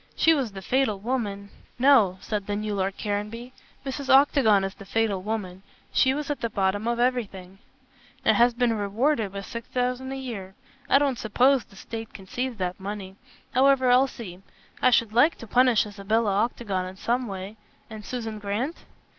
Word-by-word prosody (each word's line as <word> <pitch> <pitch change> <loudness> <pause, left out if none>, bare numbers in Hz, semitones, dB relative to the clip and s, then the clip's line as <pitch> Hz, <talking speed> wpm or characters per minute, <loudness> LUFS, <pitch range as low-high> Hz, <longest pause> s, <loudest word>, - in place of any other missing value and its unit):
She 325 - +5
was 265 -9 -1
the 195 -1 -8
fatal 255 -2 +1
woman 200 -3 -3
" - - -32
"No," 210 -10 +5
said 210 -2 -3
the 205 - -1
new 210 0 -3
Lord 195 -1 -2
Caranby, 215 +4 -4 0.3
"Mrs. 275 0 -5
Octagon 265 -7 +5
is 195 0 -3
the 200 - -12
fatal 200 -1 0
woman. 190 -3 -4 0.3
She 260 0 +3
was 295 0 -3
at 290 - -4
the 230 - -1
bottom 200 +1 0
of 235 0 0
everything." 200 -7 -2 0.7
"And - - +5
has 240 0 +4
been 240 -1 +2
rewarded 215 +2 0
with 200 0 -6
six 235 -2 -7
thousand 250 +1 -2
a - - -3
year. 215 -8 -7 0.3
I - - +6
don't 275 -4 +1
suppose 250 +4 +3
the 195 - -20
State 225 +2 -8
can 195 - -10
seize 250 +5 -3
that 185 -2 -3
money. 195 -1 -6 0.4
However, 260 -1 +4
I'll 255 +2 +5
see. 195 -8 -9 0.4
I 255 - +6
should 230 -3 +2
like 270 +8 +4
to - - -9
punish 245 0 +3
Isabella 210 +1 0
Octagon 200 -6 -3
in 185 - -9
some 240 +5 -1
way. 195 +2 -7 0.3
And 215 -1 -9
Susan 225 -2 -5
Grant?" 210 +10 -3
225 Hz, 185 wpm, -25 LUFS, 200-255 Hz, 0.7 s, I